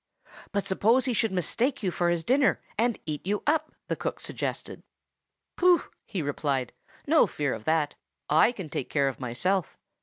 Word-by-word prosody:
"But 200 -1 -1
suppose 225 +7 +3
he 255 - +1
should 225 -1 +1
mistake 225 - 0
you 185 - +1
for 175 +1 +1
his 170 -1 0
dinner, 265 - +3 0.2
and 235 +1 +1
eat 150 -2 -4
you 205 +2 -1
up?" 310 +1 +1 0.2
the - - -1
cook - - -4
suggested. - - -4 0.8
"Pooh!" 360 -1 +5 0.2
he 185 -7 -3
replied. 140 -3 -1 0.3
"No 310 +2 +5
fear 145 -3 -1
of 110 -1 -7
that; 155 -2 +1 0.3
I 160 +10 +5
can 195 -9 -7
take 135 - -4
care 140 -2 +2
of 130 - -8
myself. 155 +9 -1
185 Hz, 175 wpm, -27 LUFS, 150-240 Hz, 0.8 s, Pooh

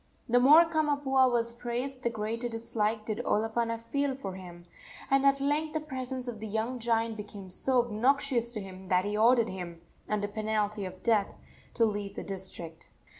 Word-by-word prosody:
The 245 0 +4
more 300 +7 +8
Kamapuaa 285 -5 +2
was 235 -1 +1
praised 245 +2 -4
the 235 - +1
greater 230 +2 -3
dislike 225 -2 -2
did 215 0 -3
Olopana 230 +1 0
feel 280 +4 -1
for 200 -8 -6
him, 175 -2 -10 0.5
and 275 0 +5
at 275 0 +4
length 295 +3 0
the 315 - 0
presence 260 -3 -5
of 230 -3 -5
the 220 - -5
young 225 +4 -2
giant 230 -1 0
became 205 -2 -8
so 250 +5 +2
obnoxious 240 +1 +1
to 215 - -3
him 190 -1 -10
that 185 +1 +2
he 205 +1 -1
ordered 230 +1 +4
him, 175 -3 -6 0.3
under 205 -1 0
penalty 210 -1 -1
of 185 0 -9
death, 220 -4 +3 0.5
to 230 - +4
leave 205 -2 -3
the - - -5
district. 185 -4 -6
230 Hz, 175 wpm, -30 LUFS, 205-255 Hz, 0.5 s, more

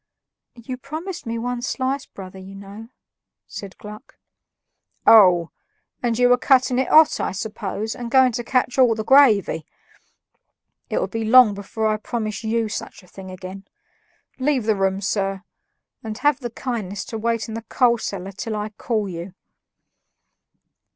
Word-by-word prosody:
"You 250 +2 -7
promised 315 +4 -7
me 230 0 -2
one 245 +1 -3
slice, 260 +2 -2
brother, 190 -1 -11
you 190 +1 -11
know," 200 +3 -11 0.6
said 195 -2 -9
Gluck. 210 0 -12 0.9
"Oh! 180 -6 +6 0.5
and 235 -2 0
you 245 0 +4
were 245 0 +4
cutting 255 -2 +3
it 260 - 0
hot, 315 0 +6
I - - -1
suppose, 210 +1 -4
and 240 -1 -6
going 260 0 +5
to 240 +1 -4
catch 250 +1 0
all 245 -3 +5
the 220 - -3
gravy. 220 - +4 1.3
It'll - - 0
be 225 -1 -4
long 230 -1 +6
before 200 +2 -4
I 215 0 +2
promise 215 -1 -4
you 225 0 0
such 210 - -7
a - - -19
thing 190 +1 -11
again. 185 +1 -9 0.7
Leave 260 -2 +1
the 220 0 +1
room, 195 0 0
sir; 195 -1 -2 0.6
and 220 -1 -5
have 290 -1 +2
the 245 -3 -5
kindness 220 -5 -5
to 225 - -6
wait 230 0 -1
in 220 - -7
the 225 - -4
coal 235 +1 +2
cellar 195 -2 -5
till 215 +3 -5
I 210 0 -3
call 215 0 -2
you." 180 +1 -7
220 Hz, 155 wpm, -22 LUFS, 200-250 Hz, 1.3 s, Oh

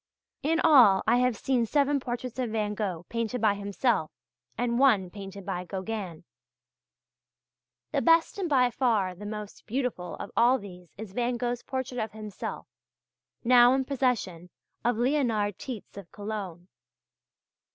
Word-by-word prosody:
In 325 +3 +1
all 245 -12 +6
I 235 +2 +4
have 250 -3 +2
seen 245 -2 0
seven 285 +3 +2
portraits 245 0 -5
of 250 -2 -1
Van 215 -1 -1
Gogh 185 -5 -3
painted 230 +1 -2
by 215 -2 +3
himself, 200 -2 0 0.5
and 235 +1 0
one 210 -10 +4
painted 195 -1 -9
by 180 -2 -3
Gauguin. 190 -2 -5 1.7
The - - +1
best 330 +3 +3
and 365 -4 -1
by 250 -4 +3
far 220 -7 +1
the 205 +3 -9
most 210 -1 -8
beautiful 240 -6 -3
of 200 - -8
all 245 +3 +5
these 180 -6 -11
is 205 -2 -8
Van 245 +2 0
Gogh's 240 0 -2
portrait 260 -2 -4
of 220 -2 -3
himself 215 -2 -6 0.8
now 245 +1 +6
in 270 - +1
the 260 - -6
possession 225 -11 -1 0.3
of 240 -1 +1
Leonhard 235 -6 +1
Tietz 245 -6 -7
of 200 -4 -10
Cologne. 200 -5 -6
225 Hz, 150 wpm, -28 LUFS, 200-250 Hz, 1.7 s, all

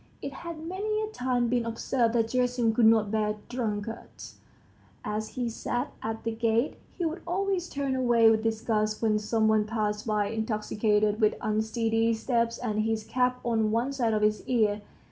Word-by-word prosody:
It - - -6
had 335 -2 -7
many 420 +4 -2
a 430 - -4
time 250 - 0
been 240 0 +1
observed 230 +1 0
that 225 -1 +2
Gerasim 245 -2 +1
could 225 0 +5
not 220 -2 +4
bear 210 -1 0
drunkards.... 225 -2 -5 0.7
As 215 +1 -2
he 245 -1 0
sat 245 +3 -3
at 220 0 -4
the 230 - -1
gates, 225 +3 0 0.2
he 350 - -1
would 330 +2 -3
always 370 0 -1
turn 275 -2 -2
away 240 -3 +4
with 220 -1 +2
disgust 220 -1 -1
when 215 -1 +3
some 220 +1 +1
one 215 -1 +3
passed 215 -1 -2
by 210 -2 +1
intoxicated, 215 -1 0
with 215 - +4
unsteady 225 +1 +1
steps 230 0 0
and 215 -4 -2
his 220 0 -1
cap 250 +1 0
on 220 -2 +1
one 235 +5 0
side 235 -5 +1
of 210 - 0
his 210 0 +2
ear. 215 -4 +2
225 Hz, 175 wpm, -28 LUFS, 215-250 Hz, 0.7 s, could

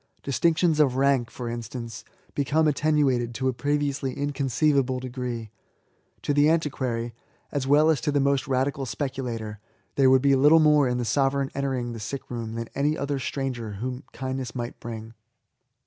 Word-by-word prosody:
Distinctions 160 +3 +2
of 140 -4 +4
rank^ 135 -2 +2
for 120 0 -6
instance^ 115 -1 -6 0.3
become 155 +3 +2
attenuated 140 -5 +1
to 130 +2 -1
a - - -1
previously 145 0 -1
inconceivable 140 -1 +1
degree. 125 -3 -5 0.7
To 145 - +1
the 145 +1 +5
antiquary, 130 -7 -1 0.4
a» 145 - -1
well 150 +3 +5
as 145 -6 0
to 145 - 0
the 145 - +2
most 140 -1 +1
radical 135 +1 0
speculator, 115 -2 -4 0.3
there 135 -2 +4
would 130 0 +5
be 140 -1 +5
little 145 +4 +6
more 150 -3 +5
in 125 0 0
the 120 - -1
sovereign 135 +2 +1
entering 130 -3 -2
the 115 - -7
sick 130 +6 -6
room 115 -2 -4
than 115 0 -4
any 150 +3 +1
other 140 -1 -2
stranger 125 -5 -3
whom 125 +6 -5
kindness 130 -2 -4
might 120 -1 -5
bring. 115 -1 -7
135 Hz, 165 wpm, -26 LUFS, 120-145 Hz, 0.7 s, little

